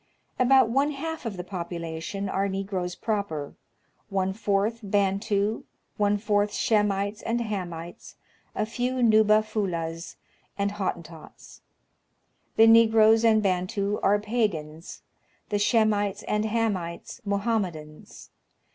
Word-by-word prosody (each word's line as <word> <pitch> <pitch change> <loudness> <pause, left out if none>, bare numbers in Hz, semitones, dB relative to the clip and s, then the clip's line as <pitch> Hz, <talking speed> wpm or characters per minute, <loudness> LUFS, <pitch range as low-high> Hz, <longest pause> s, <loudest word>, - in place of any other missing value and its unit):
About 260 0 +5
one 280 +4 +1
half 315 -2 -5
of 205 -4 -5
the 180 - -4
population 170 +1 -5
are 195 +1 -1
Negroes 190 -2 -3
proper, 200 -10 -3 0.6
one 190 -1 0
fourth 205 +2 0
Bantu, 200 +1 0 0.3
one 205 0 +2
fourth 205 0 0
Shemites 205 -1 0
and 230 +1 -1
Hamites, 175 -7 -6 0.4
a - - 0
few 245 +3 -2
Nuba 215 -1 +5
Fulahs 170 -6 -4 0.4
and 200 0 0
Hottentots. 170 -5 -7 0.9
The 225 - +7
Negroes 225 0 +6
and 220 -2 +4
Bantu 200 +2 -1
are 205 +1 +3
Pagans; 200 -8 -3 0.5
the 205 -1 0
Shemites 205 -2 +1
and 210 0 -1
Hamites, 210 -7 -2
Mohammedans. 200 -7 -3
205 Hz, 110 wpm, -26 LUFS, 185-220 Hz, 0.9 s, The